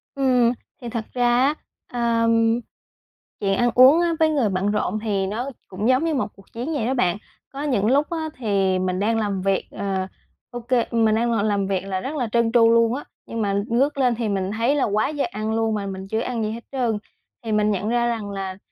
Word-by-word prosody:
Ừm, 250 -3 +3 0.3
thì 240 - -6
thật 230 -1 -3
ra 245 -1 +2
á, 290 - +2 0.4
ờ, 235 -1 +1 1.1
chuyện 195 -1 0
ăn 240 0 +3
uống 265 +7 +7
á 340 -1 +1
với 320 -1 +4
người 275 -8 +1
bận 195 +2 0
rộn 210 +1 -1
thì 200 -3 -1
nó 235 +7 -3 0.2
cũng 200 +3 -3
giống 255 +3 +3
như 330 -1 0
một 265 - 0
cuộc 195 -1 -19
chiến 250 +8 -4
vậy 265 -7 -1
đó 260 - 0
bạn. 185 -6 +1 0.4
Có 275 +2 -5
những 245 -9 +1
lúc 285 +5 +2
á 320 -2 -3
thì 195 -5 +1
mình 185 0 -1
đang 225 +2 +1
làm 200 -3 -1
việc, 195 0 0
ờ, 190 -2 -2 0.4
ô 245 - -5
kê 240 0 +1
mình 225 -2 +3
đang 235 +1 +1
ngồi 225 -3 +1
làm 200 -2 0
việc 195 -1 -1
là 190 -1 -2
rất 275 +9 -5
là 245 -6 -1
trơn 235 -1 +2
tru 230 -1 +5
luôn 230 +1 +3
á, 285 - -5 0.2
nhưng 230 - -4
mà 200 -2 0
ngước 275 +5 +1
lên 250 -3 +2
thì 230 -2 -2
mình 195 -1 -1
thấy 230 +6 +1
là 285 - +1
quá 210 +2 +1
giờ 295 -2 -1
ăn 215 +1 -3
luôn 225 0 +1
mà 200 -1 -3
mình 190 0 -6
chưa 220 +3 -1
ăn 235 -1 -2
gì 215 - -1
hết 230 +1 -6
trơn. 240 -6 0 0.5
Thì 225 - -2
mình 210 0 +2
nhận 205 +1 -1
ra 240 0 +1
rằng 225 -3 -2
là, 190 -1 -5
225 Hz, 235 wpm, -23 LUFS, 200-250 Hz, 1.1 s, uống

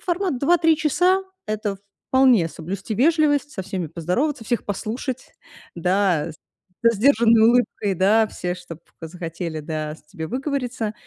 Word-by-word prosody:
формат 355 -5 -1
2-3 325 +3 +3
часа- 355 +5 +2 0.2
это 215 -2 -2 0.3
вполне 255 -10 +4
соблюсти 190 +7 -5
вежливость, 290 +3 +2
со 190 - -5
всеми 180 -3 -4
поздороваться, 225 - -2
всех 240 +1 -1
послушать, 230 +6 -5 0.4
да, 180 -2 +1 0.5
со 230 0 +5
сдержанной 230 0 +4
улыбкой, 235 -4 +1
да, 210 +5 +4
все, 180 -2 -4
чтоб 175 -3 -10 0.2
захотели, 165 -1 -5
да, 155 0 -4
с - - -22
тебе 160 +1 -7
выговориться. 255 - -3
215 Hz, 130 wpm, -22 LUFS, 180-270 Hz, 0.5 s, со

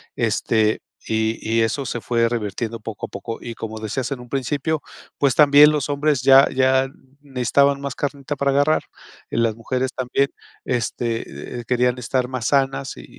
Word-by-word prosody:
Este, 110 -1 +1 0.3
y 110 0 0
y 115 +1 +1
eso 115 +5 0
se 120 - -4
fue 115 0 +1
revirtiendo 115 0 -3
poco 110 -1 -6
a - - -25
poco. 115 +3 -6
Y 115 -1 -7
como 110 -1 -6
decías 115 +5 -3
en 135 - -3
un 125 - -12
principio, 145 +4 -1 0.4
pues, 140 -2 +2
también 150 0 +7
los 150 -3 -1
hombres 145 -1 +1
ya 135 +1 +7
ya 130 0 +3 0.3
necesitaban 140 +1 +1
más 140 0 -4
carnita 145 0 -3
para 140 0 +1
agarrar 145 +3 +2 0.5
y - - -4
las 115 -2 +2
mujeres 125 +3 -2
también, 130 +2 0 0.4
este, 115 -1 -1
eh 120 - -8
eh, - - -12
querían 125 0 +2
estar 125 +1 -1
más 130 -3 -3
sanas, 135 -1 0
y - - -10
125 Hz, 180 wpm, -21 LUFS, 115-140 Hz, 0.5 s, también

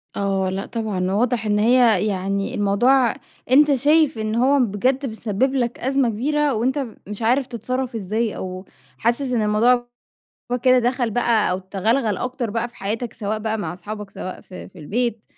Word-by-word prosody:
آه، 195 -1 0
لأ 190 +1 -3
طبعًا 205 -5 -2
واضح 225 +2 0
إن 210 0 +1
هي 225 -3 +4
يعني 195 0 -2
الموضوع 235 +5 +3 0.4
أنت 290 +1 +6
شايف 295 0 +3
إن 215 0 -2
هو 270 +4 +3
بجد 255 +5 +1
بيسبّب 225 +2 -1
لك 240 -2 -1
أزمة 265 -1 +1
كبيرة 290 +5 0
وأنت 260 +5 0 0.2
مش 210 +2 -7
عارف 250 +4 +2
تتصرّف 255 0 -4
إزاي 220 +2 -2
أو 185 0 -6 0.3
حاسس 235 +4 +1
إن 250 -4 0
الموضوع 240 +4 +3 0.6
هو 245 - +1
كده 255 0 +4
دَخَل 245 0 0
بقى 230 -3 +2
أو 185 - -1
تغلغل 205 +3 0
أكتر 250 -2 -3
بقى 230 +3 -2
في 240 - -22
حياتك، 220 +4 -4
سواء 215 -1 -3
بقى 220 0 -2
مع 175 -5 -4
أصحابك 210 +3 -7
سواء 185 -1 -7
في 185 - -11
في 185 - -16
البيت. 225 +7 -2
230 Hz, 170 wpm, -21 LUFS, 205-250 Hz, 0.6 s, أنت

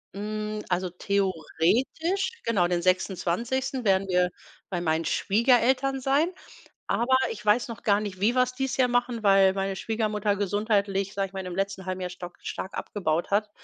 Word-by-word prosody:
Hm. 215 +1 -4
Also, 180 0 0
theoretisch 200 - 0
genau, 195 -7 +2
den 175 -1 0
26. 220 +8 0
werden 195 0 +3
wir 180 0 +3 0.4
bei 175 -3 -2
meinen 160 0 0
Schwiegereltern 255 +5 +2
sein. 285 +7 +2 0.6
Aber 260 +3 +3
ich 210 -1 -7
weiß 220 +4 +3
noch 230 - -8
gar 205 -1 +3
nicht, 195 -3 -6
wie 225 +5 +3
wir 255 - +4
es 255 0 -2
dieses 265 0 -2
Jahr 255 -2 +3
machen, 245 -2 0
weil 195 -1 +5
meine 195 0 -2
Schwiegermutter 210 -2 -1
gesundheitlich, 200 -1 0
sage 195 -1 -1
ich - - -25
mal, 190 -1 -5
im 180 - -5
letzten 195 -1 -2
halben 185 0 -3
Jahr 180 - -3
stark 175 0 -9
stark 190 - -5
abgebaut 170 -4 -2
hat. 210 +1 +1
205 Hz, 170 wpm, -26 LUFS, 185-235 Hz, 0.6 s, weil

